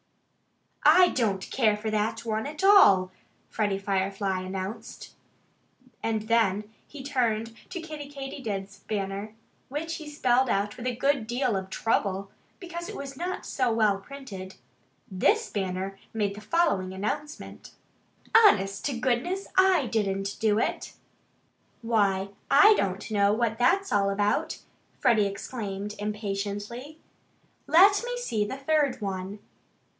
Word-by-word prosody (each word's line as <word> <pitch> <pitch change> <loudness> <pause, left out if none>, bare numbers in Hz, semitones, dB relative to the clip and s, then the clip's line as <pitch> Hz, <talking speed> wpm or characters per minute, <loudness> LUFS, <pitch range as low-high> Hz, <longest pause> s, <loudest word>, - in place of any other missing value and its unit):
"I 365 0 +7
don't 200 -7 -1
care 215 -5 +2
for 215 +1 -3
that 215 +2 -1
one 220 +2 -2
at 305 +4 -6
all," 200 - +6 0.4
Freddie 205 -3 0
Firefly 195 0 -1
announced. 190 +3 -6 0.9
And 220 -1 -1 0.6
he 280 -2 -10
turned 230 -5 0
then 225 - -15
to 360 -2 -5
Kiddie 305 -3 -8
Katydid's 245 -9 -6
banner, 200 +1 -4 0.3
which 325 +4 -4
he 310 -1 -8
spelled 260 -3 +2
out 205 +1 0
with 250 0 -5
a 245 - -1
good 275 -2 +1
deal 245 -1 0
of 190 0 -4
trouble, 195 -2 -1 0.3
because 345 -1 -7
it - - -7
was 275 -1 -7
not 355 +6 -4
so 255 -3 0
well 215 -3 +2
printed. 195 -6 -9 0.5
This 425 - +1
banner 190 0 -3
made 205 -3 -1
the 210 - -10
following 215 - +1
announcement: 290 +10 -5 0.6
HONEST 195 - +5
TO 270 -5 -2
GOODNESS, 265 +11 -1
I 375 -6 +4
DIDN'T 200 -3 -1
DO 215 -2 +2
IT! - - -2 0.9
"Why, 200 -4 +1 0.2
I 405 +10 +8
don't 195 - -2
know 200 -1 +3
what 225 0 0
that's 390 +10 +2
all 200 -1 +3
about!" 205 +1 0 0.4
Freddie 225 -6 +3
exclaimed 200 -1 -5
impatiently. 210 +6 -4 0.7
"Let 395 +5 +6
me - - -3
see 230 - -1
the 265 - -5
third 275 -2 +1
one!" 195 -1 -4
220 Hz, 130 wpm, -27 LUFS, 200-280 Hz, 0.9 s, I